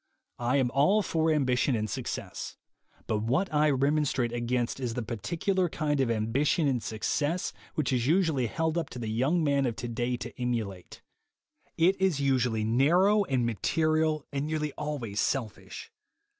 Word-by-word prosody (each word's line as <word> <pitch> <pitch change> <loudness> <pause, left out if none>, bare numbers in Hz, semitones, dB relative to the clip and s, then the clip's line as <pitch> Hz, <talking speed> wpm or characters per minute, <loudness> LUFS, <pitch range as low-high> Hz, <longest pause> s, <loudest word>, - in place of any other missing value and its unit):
I 120 +3 +1
am 125 -3 +1
all 190 +11 +3
for 160 -2 +1
ambition 130 -3 +2
and 110 -1 -1
success, - - -5 0.5
but 110 - 0
what 135 - 0
I 150 0 +4
remonstrate 140 -3 +1
against 120 +1 -1
is 120 -3 -3
the 125 - -2
particular 170 - -1
kind 150 -2 -1
of 130 - +1
ambi 115 +4 0
tion 155 0 +2
and 130 -4 0
success 145 +11 -1 0.2
which 150 -3 0
is 125 -1 0
usually 160 -7 +2
held 160 +6 -1
up 165 - -4
to - - -9
the 115 -3 -4
young 140 +10 +1
man 140 -2 +2
of 115 - -2
today 120 +1 -2
to 120 +1 -8
emulate. 110 -7 -4 0.7
It 185 +4 +3
is 185 -7 +2
usually 125 -5 +1
narrow 175 - +3
and 130 -6 0
material, 155 +6 +1
and 140 +1 -1
nearly 155 -1 -2
always 130 -9 -3
selfish. 125 - -3
135 Hz, 160 wpm, -28 LUFS, 120-155 Hz, 0.7 s, I